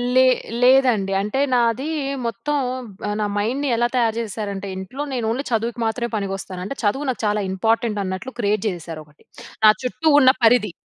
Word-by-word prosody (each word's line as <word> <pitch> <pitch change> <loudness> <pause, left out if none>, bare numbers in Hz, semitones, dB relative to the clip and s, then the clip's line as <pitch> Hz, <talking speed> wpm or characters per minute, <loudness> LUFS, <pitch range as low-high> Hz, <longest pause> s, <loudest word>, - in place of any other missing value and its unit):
లే 260 - +7 0.4
లేదండి. 245 -7 +4
అంటే, 210 +6 -2
నాది 240 +4 +1 0.4
మొత్తం 290 +6 -2 0.6
నా - - +1
మైండ్‌ని 260 +7 -1
ఎలా 240 +1 +2
తయారు 230 -3 +2
చేశారంటే, 200 -3 -5
ఇంట్లో, 190 +9 -6
నేను 240 -3 -2
ఓన్లీ 255 +5 -1
చదువుకి 230 +1 -1
మాత్రమే 235 +2 -1
పనికొస్తాను. 195 -2 -4
అంటే, 240 - -5
చదువు 270 +8 0
నాకు 255 - -3
చాలా 210 0 +1
ఇంపార్టెంట్ 225 +2 0
అన్నట్లు 190 +8 -5
క్రియేట్ 210 -2 0
చేసేసారు 165 -4 -5
ఒకటి. 150 0 -25 0.4
నా - - +10
చుట్టూ 255 +5 -2
ఉన్న 260 -2 +7
పరిధి. 225 -3 +4
225 Hz, 160 wpm, -21 LUFS, 200-250 Hz, 0.6 s, నా